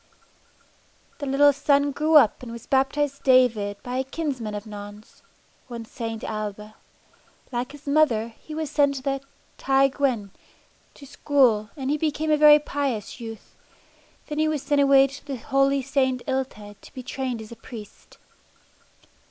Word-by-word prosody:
The 285 - -4
little 285 +2 +5
son 285 0 +2
grew 310 +3 +1
up 265 -9 +6
and 245 -2 -8
was 235 -1 -9
baptised 280 +1 0
David 230 -6 +3
by 250 +1 -4
a 260 - 0
kinsman 265 -7 -4
of 205 +1 -6
Non's, 205 +1 -11 0.5
one 235 -2 -7
St. 225 -1 -6
Ailbe. 215 0 -5 0.8
Like 245 +2 -3
his 290 0 -14
mother, 280 -7 +2
he 305 +7 -11
was 310 -2 -4
sent 285 -2 +2
to 260 - -6
the 275 -1 -1 0.4
"Ty 270 0 +3
Gwyn" 255 -8 -1 0.6
to 280 - -13
school 255 -6 +2
and 270 0 -2
he 300 - 0
became 310 0 -1
a - - +5
very 300 0 +8
pious 280 -7 -3
youth. 225 -2 -9 0.7
Then 300 0 -4
he 310 - +3
was 305 -3 -2
sent 285 0 +2
away 275 -1 +6
to 275 +1 -8
the 275 -2 -5
holy 275 +3 +1
St. 260 -2 0
Illtyd 235 -6 -4
to - - -16
be 255 - -7
trained 255 -2 -4
as 220 0 -10
a - - -8
priest. 225 -2 -12
265 Hz, 160 wpm, -24 LUFS, 230-285 Hz, 0.8 s, very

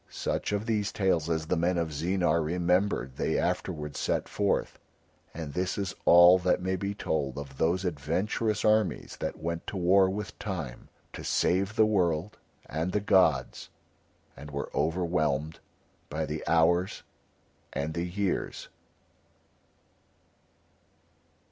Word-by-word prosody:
Such - - -2
of 105 +1 -1
these 105 -3 0
tales 85 -5 +1
as 80 -1 -1
the 85 - 0
men 85 +2 +1
of 85 -2 -1
Zeenar 85 +1 +1
remembered 90 -3 0
they - - 0
afterwards 75 -1 -2
set - - -1
forth, 100 -1 -1 0.5
and 80 -3 -7
this 90 +3 -1
is 100 -2 -2
all 85 +2 +8
that 90 0 +2
may 95 +1 -1
be 100 +2 -3
told 70 -8 -2
of 70 -1 -8
those 90 +4 +1
adventurous 90 +8 -1
armies 110 -3 +1
that - - -3
went 85 +1 -4
to 100 - -4
war 95 +2 +4
with 100 +1 -5
Time 80 - -5 0.2
to - - -7
save 95 +4 +1
the 110 - +5
world 95 -1 0 0.3
and 80 +5 -3
the 105 - +2
gods, 80 -10 +2 0.7
and 75 - -10
were 70 -1 -5
overwhelmed 80 -2 0 0.5
by 80 +2 -2
the 75 +1 -4
hours 85 +3 +2 0.7
and 75 +3 -3
the 85 +2 -2
years. 95 +1 -2
85 Hz, 135 wpm, -28 LUFS, 80-95 Hz, 0.7 s, all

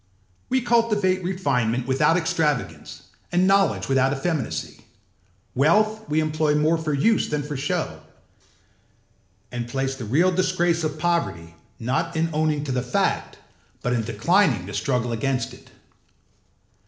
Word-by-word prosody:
We 260 0 +2
cultivate 210 -6 +2
refinement 130 -10 0
without 135 +6 +3
extravagance 155 -5 -2 0.3
and 180 +1 +3
knowledge 195 0 +2
without 135 0 +2
effeminacy; 135 - -3 0.7
wealth 215 +10 +2
we 155 - +2
employ 155 -1 +1
more 155 +2 +2
for 160 -1 -2
use 180 +11 +2
than 150 -1 -1
for 145 0 -5
show, 140 +2 -2 1.5
and 120 -1 -4
place 135 +2 -2
the 130 -4 -7
real 160 - +3
disgrace 175 -2 +1
of 155 -1 -2
poverty 95 - -1 0.3
not 165 +8 -1
in 165 +1 0
owning 155 -1 0
to 140 - -4
the 125 -1 0
fact 125 0 -1 0.5
but 125 - 0
in 120 - +1
declining 115 - +2
the 100 - -8
struggle 125 0 -1
against 125 +1 -1
it. - - -16
150 Hz, 135 wpm, -23 LUFS, 125-175 Hz, 1.5 s, without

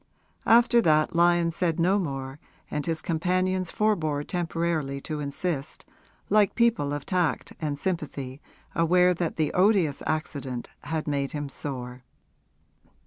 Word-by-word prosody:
After 235 +1 +6
that 155 -3 +3
Lyon 170 0 +4
said 165 0 -1
no 190 +4 +3
more 135 -4 -4 0.3
and 150 -1 -2
his 165 0 -2
companions 185 +2 0
forbore 160 -9 0
temporarily 165 -5 -2
to 155 0 -4
insist, 145 +1 -4 0.4
like 210 -1 +3
people 235 -12 +2
of 145 -1 -4
tact 180 -4 0
and 150 -2 -2
sympathy 145 -6 -4 0.3
aware 180 +2 +4
that 170 -1 -2
the 155 -2 0
odious 185 -6 +3
accident 140 -5 -3 0.2
had 155 0 -3
made 140 -2 -1
him 145 -2 -4
sore. 125 -3 -6
160 Hz, 130 wpm, -26 LUFS, 145-180 Hz, 0.4 s, After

